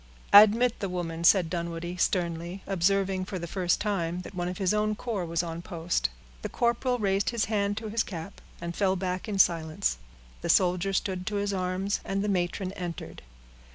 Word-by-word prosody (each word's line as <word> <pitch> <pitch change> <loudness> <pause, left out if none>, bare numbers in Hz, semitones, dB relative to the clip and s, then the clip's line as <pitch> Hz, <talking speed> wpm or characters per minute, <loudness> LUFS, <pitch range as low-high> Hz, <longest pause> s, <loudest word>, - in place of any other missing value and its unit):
"Admit 215 +4 +7
the 195 - -2
woman," 170 -2 -4
said 180 0 +5
Dunwoodie, 170 +1 -4
sternly, 175 0 -1
observing, 195 0 +1
for 190 - -5
the 170 - -5
first 175 0 0
time, 180 -4 -1
that 180 - -10
one 175 -1 -2
of 180 0 -4
his 190 0 +1
own 210 0 +1
corps 210 -6 -3
was 170 +1 0
on 165 0 -5
post. 170 - -1 0.3
The - - -4
corporal 245 +1 +1
raised 200 -2 +1
his 235 -3 0
hand 205 -1 0
to 220 0 -4
his 225 +2 +1
cap, 180 -1 -6 0.2
and 170 0 -5
fell 190 -2 +2
back 185 +1 -3
in 200 - -2
silence; 160 - +2 0.4
the - - -4
soldier 180 +1 +3
stood 185 -1 -2
to 210 - -2
his 200 0 -1
arms, 185 +1 -1
and 195 +1 -2
the 210 - -1
matron 185 0 -1
entered. 175 -4 -6
185 Hz, 190 wpm, -28 LUFS, 175-200 Hz, 0.4 s, Admit